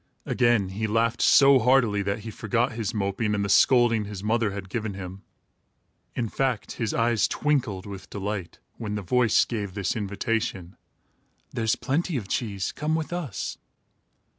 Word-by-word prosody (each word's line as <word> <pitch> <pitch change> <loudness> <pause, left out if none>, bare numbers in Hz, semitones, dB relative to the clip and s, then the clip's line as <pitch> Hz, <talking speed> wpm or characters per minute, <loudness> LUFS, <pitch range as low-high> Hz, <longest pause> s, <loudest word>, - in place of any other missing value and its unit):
Again, 120 -6 +2
he 105 +3 -3
laughed 115 +2 +1
so 135 -1 +7
heartily, 120 -4 +3
that 100 +2 -2
he 110 +1 -7
forgot 115 +4 0
his 115 -3 -3
moping 105 +1 -1
and 100 0 -1
the - - -3
scolding 120 -1 +4
his 100 -2 -7
mother 110 0 +1
had 100 -1 -6
given 105 0 -4
him. 95 0 -8 0.9
In 115 - -1
fact, 130 -1 -1
his 115 -3 -2
eyes 115 -2 +2
twinkled 125 -11 -1
with 100 -2 -9
delight, 100 -3 -4 0.2
when 105 -2 -3
the 105 - -4
voice 120 +3 +3
gave 100 -5 -4
this 100 -3 -1
invitation: 100 -3 -2 0.8
"There's 110 -1 0
plenty 155 +3 -1
of 105 -6 -5
cheese. 100 -3 -2
Come 155 +2 -1
with 160 +1 -3
us." 165 - -4
110 Hz, 160 wpm, -26 LUFS, 100-120 Hz, 0.9 s, so